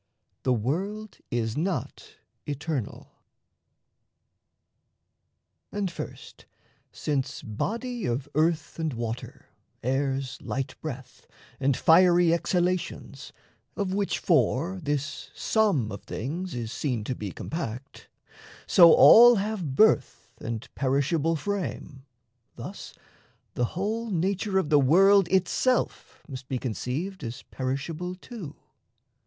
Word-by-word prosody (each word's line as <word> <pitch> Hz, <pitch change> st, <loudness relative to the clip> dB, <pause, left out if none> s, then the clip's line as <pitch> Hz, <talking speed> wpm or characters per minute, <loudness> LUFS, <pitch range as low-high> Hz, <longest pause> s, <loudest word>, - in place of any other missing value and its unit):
THE 130 Hz, -, +2 dB
WORLD 190 Hz, -, -3 dB
IS 115 Hz, -2 st, -1 dB
NOT 175 Hz, +4 st, -3 dB, 0.3 s
ETERNAL 145 Hz, -5 st, -4 dB, 2.6 s
And 200 Hz, -3 st, -2 dB
first, -, -, -9 dB, 0.4 s
Since 140 Hz, -3 st, -3 dB
body 230 Hz, -, -3 dB
of 130 Hz, +4 st, -2 dB
earth 160 Hz, +1 st, 0 dB
and 160 Hz, -3 st, -1 dB
water, 115 Hz, 0 st, -6 dB, 0.4 s
air's 135 Hz, +1 st, -1 dB
light 135 Hz, 0 st, -3 dB
breath, 135 Hz, -4 st, -8 dB, 0.3 s
And 135 Hz, -1 st, +1 dB
fiery 175 Hz, 0 st, +5 dB
exhalations 180 Hz, +1 st, -2 dB, 0.4 s
(of 195 Hz, -2 st, -2 dB
which 200 Hz, 0 st, 0 dB
four 175 Hz, +2 st, +1 dB
This 145 Hz, -1 st, -3 dB
sum 195 Hz, -, +1 dB
of 100 Hz, -, -7 dB
things 165 Hz, +8 st, -4 dB
is 115 Hz, -2 st, -4 dB
seen 125 Hz, -3 st, -2 dB
to 130 Hz, -, -3 dB
be 105 Hz, -5 st, -5 dB
compact) 135 Hz, -, -6 dB, 0.6 s
So 170 Hz, -3 st, +8 dB
all 240 Hz, +1 st, +9 dB
have 195 Hz, -9 st, -2 dB
birth 220 Hz, +7 st, +3 dB
and 115 Hz, -1 st, -5 dB
perishable 145 Hz, +4 st, +1 dB
frame, 160 Hz, -7 st, -4 dB, 0.5 s
Thus -, -, -9 dB, 0.6 s
the 120 Hz, -, 0 dB
whole 220 Hz, +4 st, -2 dB
nature 195 Hz, +2 st, 0 dB
of 160 Hz, -5 st, 0 dB
the 145 Hz, -, +6 dB
world 190 Hz, +7 st, +5 dB
itself 190 Hz, +8 st, 0 dB
Must 130 Hz, -3 st, -8 dB
be 130 Hz, -, -2 dB
conceived 135 Hz, -, -4 dB
as 115 Hz, 0 st, -6 dB
perishable 155 Hz, +7 st, -3 dB
too. 185 Hz, -, -9 dB
155 Hz, 105 wpm, -27 LUFS, 130-190 Hz, 2.6 s, all